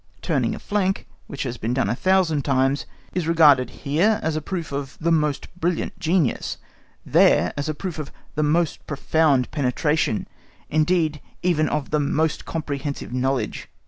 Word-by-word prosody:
Turning - - 0
a - - -7
flank, 195 -2 -1 0.2
which 140 - -4
has 125 -2 -4
been 115 +3 -2
done 130 - +1
a - - +1
thousand 185 -3 +2
times, 135 +1 +1 0.3
is 175 -3 -1
regarded 145 -7 +5 0.2
here 175 +10 +3
as 160 0 0
a 155 - -1
proof 170 -1 -4
of 140 -1 -5
the 170 +1 +1
most 150 -3 +1
brilliant 175 +2 -1
genius, 165 -5 0 0.5
there - - +4
as 140 +2 -3
a 155 - -2
proof 175 0 -5
of 150 - -6 0.2
the 155 - -1
most 155 +2 +1
profound 150 -3 +2
penetration, 145 -2 0 0.4
indeed 155 -1 +2 0.2
even 165 -3 +2
of 150 -3 -2
the 150 - +2
most 150 +2 0
comprehensive 145 -5 -4
knowledge. 130 -2 -1
150 Hz, 160 wpm, -23 LUFS, 140-165 Hz, 0.5 s, regarded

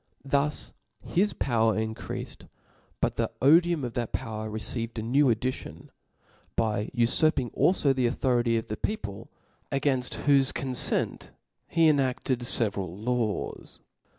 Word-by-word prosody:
Thus 140 +2 0 0.3
his 200 +4 +2
power 115 -3 +1
increafed: 110 0 -5 0.5
but - - 0
the - - 0
(OP'onyC 145 +6 +7
odijum 170 -4 -2
of 120 - -5
that 120 -2 -3
power 110 -1 -4
received 115 +2 -3
a 110 - -2
jiew 130 +3 +3
addition, 110 -8 -4 0.7
byj>gojt^^"' 110 0 -1
ufurping 125 +2 +3
alfo 150 -6 +3
the 130 -2 +1
authority 120 -2 +1
of 115 - -3
the 105 - -5
people, 105 - -4 0.4
againft 135 -2 0
whofe 140 -2 +4
confent 130 -2 -1 0.4
he 165 -1 +3
enafted 135 -3 +1
feveral 100 -7 0
laws. 120 -4 -2
125 Hz, 125 wpm, -27 LUFS, 110-140 Hz, 0.7 s, OP'onyC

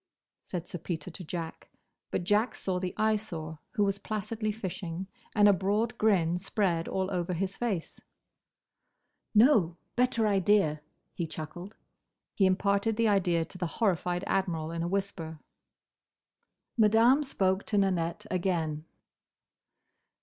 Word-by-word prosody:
said 175 -2 -5
Sir 175 - -6
Peter 165 +1 -4
to 180 - -8
Jack. 165 0 -6 0.4
But - - -1
Jack 210 +5 +2
saw 185 -2 -2
the 180 -1 -4
Eyesore, 200 -8 -1
who 210 -5 +2
was 200 0 0
placidly 215 +1 -2
fishing, 185 -4 -5 0.3
and 205 -1 +6
a 205 - +7
broad 205 +5 0
grin 180 -5 +3
spread 180 -3 0
all 190 0 -1
over 180 -1 -1
his 190 +2 -2
face. 205 -9 -3 1.3
"No! 210 - +5 0.2
Better 245 -2 +2
idea!" 195 -6 +3 0.3
he 170 - -3
chuckled. 175 +6 -7 0.6
He 195 - +4
imparted 200 +3 +1
the 230 -1 +3
idea 175 -5 +2
to 185 +2 -10
the 175 - 0
horrified 180 -4 +1
Admiral 170 -5 -1
in 165 0 -3
a 170 - -1
whisper. 180 -4 -3 1.4
Madame 230 +5 +5
spoke 190 -8 +1
to 210 - 0
Nanette 185 0 0
again. 165 -4 -1
190 Hz, 130 wpm, -30 LUFS, 170-210 Hz, 1.4 s, a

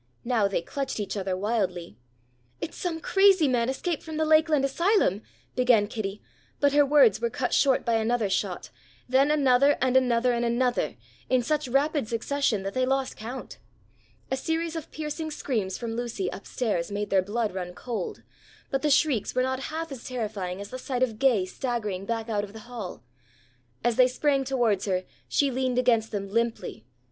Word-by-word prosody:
Now 230 -5 +2
they 195 -4 -1
clutched 270 +4 -4
each 205 - -3
other 190 -2 -2
wildly. 185 - -2 0.6
"It's - - -5
some 340 -3 -3
crazy 385 -2 +4
man 245 -2 +1
escaped 315 +4 -2
from 315 -1 -6
the 315 - +1
Lakeland 310 -2 +4
asylum," 310 - +2 0.3
began 250 -4 +4
Kitty, 205 -1 -5 0.4
but 285 -1 +3
her 290 0 +6
words 295 - +5
were 470 - +1
cut - - -2
short 270 -3 +3
by 230 -2 +2
another 225 0 +1
shot, 190 -1 -2 0.4
then 265 +3 +4
another 280 -1 +4
and 260 0 +1
another 250 -1 +3
and 235 0 0
another, 240 +1 0 0.3
in 255 -1 +3
such 300 +3 0
rapid 280 0 +1
succession 230 -2 0
that 195 0 -4
they 255 - +1
lost 265 +1 0
count. 240 +5 -7 0.7
A 265 - +1
series 325 +3 -2
of 325 - -5
piercing 315 +1 -4
screams 220 -10 -2
from 230 -2 -4
Lucy, 230 -6 -3
up 195 - -9
stairs, 205 -8 -1
made 205 +1 -3
their 195 -1 +4
blood 210 +2 -2
run 180 -1 -5
cold, 225 -5 -5 0.5
but 270 - 0
the 300 - +1
shrieks 275 -7 +2
were 255 - +3
not 260 +1 -2
half 325 0 -4
as 260 -4 -7
terrifying 210 -7 -4
as 200 0 -7
the 255 - -5
sight 255 -1 -1
of 225 -4 -2
Gay 245 -9 +3
staggering 210 -3 -3
back 225 -1 -2
out 210 -3 -1
of 205 -1 -8
the 220 - -9
hall. 215 - -7 0.8
As 240 -1 +1
they 255 - +7
sprang 275 +1 +1
towards 240 -7 +1
her 185 -2 0 0.2
she 280 -2 +2
leaned 255 -1 -1
against 230 -3 +3
them 200 -2 -3
limply. 230 - -2
245 Hz, 185 wpm, -27 LUFS, 210-275 Hz, 0.8 s, they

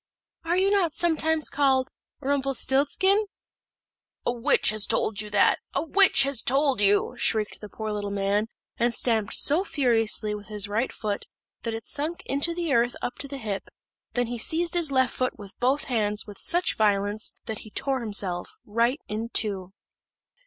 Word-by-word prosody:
"Are 345 +2 +1
you 385 +2 +3
not 370 -6 +2
sometimes 320 -2 +1
called 265 -2 +2 0.3
Rumpelstilzchen?" 280 +8 +1 1.0
"A - - +2
witch 245 +4 +2
has 215 -1 +1
told 215 -1 +1
you 210 - -7
that 205 -1 +3 0.2
a - - +1
witch 365 -3 +5
has 275 -3 0
told 270 -2 +2
you!" 205 0 +3
shrieked 215 -2 0
the 210 - -8
poor 220 +1 -5
little 205 -1 -3
man, 200 +2 0 0.3
and 240 0 +1
stamped 220 -4 0
so 315 +6 +4
furiously 230 - +1
with 205 -1 -7
his 210 -1 +1
right 220 +5 -1
foot 205 -2 -4 0.3
that 230 -1 -3
it 225 - -7
sunk 310 +4 -3
into 290 +5 0
the 340 -4 -1
earth 240 0 +2
up 245 - -4
to 280 - -5
the 280 0 -6
hip; 210 -6 -4 0.5
then 245 -1 +1
he 240 0 -5
seized 335 +8 +2
his 340 -5 +3
left 260 -1 +2
foot 255 0 -2
with 200 -2 -11
both 260 +4 +2
hands 210 -4 0
with 205 -3 -11
such 350 +1 +1
violence, 205 0 0
that 220 -2 -4
he 215 - -11
tore 270 +5 -1
himself 200 -6 -2
right 235 +6 +1
in 220 +2 -4
two. 195 -6 -1
240 Hz, 175 wpm, -26 LUFS, 210-285 Hz, 1.0 s, witch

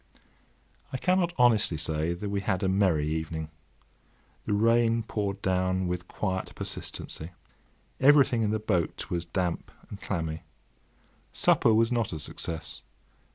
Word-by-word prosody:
I 130 - -2
cannot 180 +3 +2
honestly 115 -8 +4
say 80 +2 0
that 100 +3 -5
we 100 -1 -1
had 95 0 -1
a - - +2
merry 95 -6 +2
evening. 80 0 -3 1.0
The - - +1
rain 115 +2 +3
poured 100 -3 -3
down 95 0 +1
with 90 0 -3
quiet 95 -3 -3
persistency. 80 +3 -6 0.7
Everything 135 -4 +5
in 105 - +1
the 110 - +1
boat 95 -6 -2
was 85 -1 -1
damp 90 0 -2 0.2
and 100 - -8
clammy. 80 -4 -3 0.9
Supper - - +4
was 115 +2 +3
not 115 -6 0
a - - -3
success. 80 +2 -5
95 Hz, 135 wpm, -28 LUFS, 85-115 Hz, 1.0 s, Everything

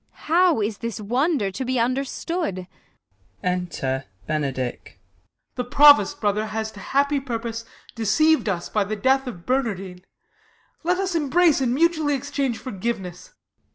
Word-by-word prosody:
How 335 -5 +4
is 205 0 -2
this 230 -1 -4
wonder 245 - 0
to 195 - -4
be 255 -1 -1
understood? 255 - -2 0.8
Ente) 170 -8 -2 0.2
Benedick. 135 -5 -2
Ben. - - -17 0.6
The 250 - -3
Provost, 280 -4 +6
brother, 210 0 0
has 220 0 -3
to 205 - -12
happy 280 +5 +1
pur 255 -4 -3
pose 230 0 -6 0.3
Deceiv'd 230 +5 +2
us 175 -3 -2
by 210 - 0
the 210 +2 -3
death 265 +5 +2
of 175 -9 -8
Bernardine. 195 -8 -2 0.8
Let 355 +2 +1
us 380 -1 -1
embrace 320 0 +3
and 250 -1 +1
mutually 315 -2 +2
exchange 275 -3 -2
Forgiveness 220 - -5
235 Hz, 140 wpm, -23 LUFS, 200-285 Hz, 0.8 s, Provost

